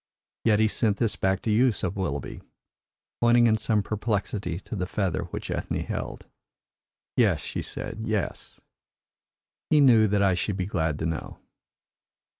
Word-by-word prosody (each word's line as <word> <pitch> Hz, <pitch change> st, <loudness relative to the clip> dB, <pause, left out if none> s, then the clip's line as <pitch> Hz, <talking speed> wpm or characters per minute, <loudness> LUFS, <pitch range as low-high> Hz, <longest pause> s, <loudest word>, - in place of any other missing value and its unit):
"Yet 110 Hz, -2 st, +4 dB
he 110 Hz, -, +4 dB
sent 105 Hz, -1 st, 0 dB
this 115 Hz, -1 st, 0 dB
back 95 Hz, 0 st, 0 dB
to 110 Hz, -, 0 dB
you," 120 Hz, +4 st, +4 dB
said 95 Hz, -3 st, -3 dB
Willoughby, 80 Hz, -8 st, -3 dB, 0.8 s
pointing 120 Hz, 0 st, +5 dB
in 110 Hz, -2 st, +4 dB
some 105 Hz, -1 st, +1 dB
perplexity 100 Hz, -4 st, -2 dB
to -, -, -7 dB
the 90 Hz, -2 st, -2 dB
feather 90 Hz, -5 st, -1 dB
which 85 Hz, -, -6 dB
Ethne -, -, -2 dB
held. -, -, -5 dB, 0.9 s
"Yes," -, -, +3 dB
she -, -, -4 dB
said, -, -, -6 dB
"yes. -, -, -3 dB, 1.1 s
He 155 Hz, -, +5 dB
knew 120 Hz, -6 st, +6 dB
that 100 Hz, 0 st, +2 dB
I 95 Hz, -1 st, +4 dB
should 95 Hz, +2 st, -1 dB
be 90 Hz, -, -1 dB
glad 80 Hz, -6 st, -1 dB
to 80 Hz, -, -3 dB
know." 80 Hz, -1 st, -4 dB
100 Hz, 155 wpm, -26 LUFS, 90-110 Hz, 1.1 s, knew